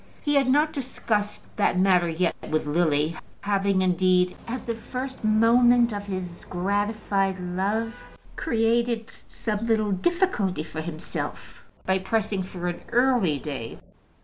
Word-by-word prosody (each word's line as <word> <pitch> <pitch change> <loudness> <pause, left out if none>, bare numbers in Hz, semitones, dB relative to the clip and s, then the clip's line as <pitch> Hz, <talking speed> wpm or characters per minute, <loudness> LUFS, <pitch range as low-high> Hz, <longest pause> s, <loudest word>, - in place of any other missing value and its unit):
He 290 - +1
had 275 -2 +4
not 300 +3 +3
discussed 225 -6 -2
that 205 - +2
matter 180 -2 +4
yet 165 +1 0
with 155 0 0
Lily, 155 0 +1 0.3
having, 200 -1 +1
indeed, 180 0 +3
at 235 0 -4
the 235 - -1
first 255 +3 -6
moment 235 +2 +5
of 205 0 -5
his 185 -3 -5
gratified 195 0 0
love, 205 +7 -2 0.3
created 230 -3 0 0.2
some 215 0 -3
little 215 -2 +2
difficulty 205 - +1
for 160 0 -6
himself 160 -1 -6 0.2
by 190 0 +2
pressing 205 0 -1
for 180 -1 -5
an 175 -1 -3
early 240 - +3
day. 135 -5 -6
205 Hz, 130 wpm, -25 LUFS, 180-230 Hz, 0.3 s, moment